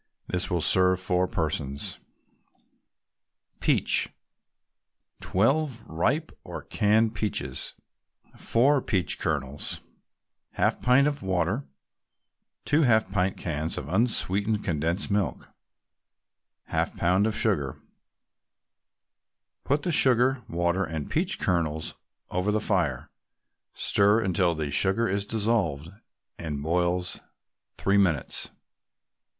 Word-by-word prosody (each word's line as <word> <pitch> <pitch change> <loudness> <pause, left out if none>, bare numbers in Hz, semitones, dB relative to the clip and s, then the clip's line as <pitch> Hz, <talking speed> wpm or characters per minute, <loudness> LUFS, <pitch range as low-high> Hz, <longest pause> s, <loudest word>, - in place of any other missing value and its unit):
This 90 0 -1
will 85 -2 0
serve 95 +2 +3
four 90 0 +1
persons. 75 -5 -3 1.6
PEACH - - +2 1.1
12 130 +4 +1
ripe 130 - 0
or - - -7
canned 110 +2 +2
peaches 105 -2 -2 0.6
4 135 +4 +2
peach 95 -11 -1
kernels 70 -1 -3 0.8
1/2 - - +1
pint 125 +3 +5
of 145 -1 -2
water 95 - -1 1.0
2 150 +2 +3
half 110 -8 +3
pint 95 -1 0
cans 80 -1 -2
of 70 - -5
unsweetened 105 0 +1
condensed 85 +5 -1
milk 100 -2 -1 1.2
1/2 - - -1
pound 95 +5 +2
of 110 - -2
sugar 75 - 0 1.9
Put 145 +2 0
the 180 - 0
sugar, 130 -2 +4
water 85 +3 0
and 80 -4 -5
peach 185 +4 0
kernels 80 -4 -1 0.4
over 90 +3 0
the 110 - +1
fire; 85 - -1 0.6
stir 105 +2 +4
until 90 -4 +1
the 75 -2 -3
sugar 100 +9 +2
is 100 0 -1
dissolved, 100 -10 0 0.5
and 75 -4 -4
boil 90 +2 +1 0.7
three 100 +1 +2
minutes. 85 -9 +1
95 Hz, 100 wpm, -27 LUFS, 85-110 Hz, 1.9 s, pint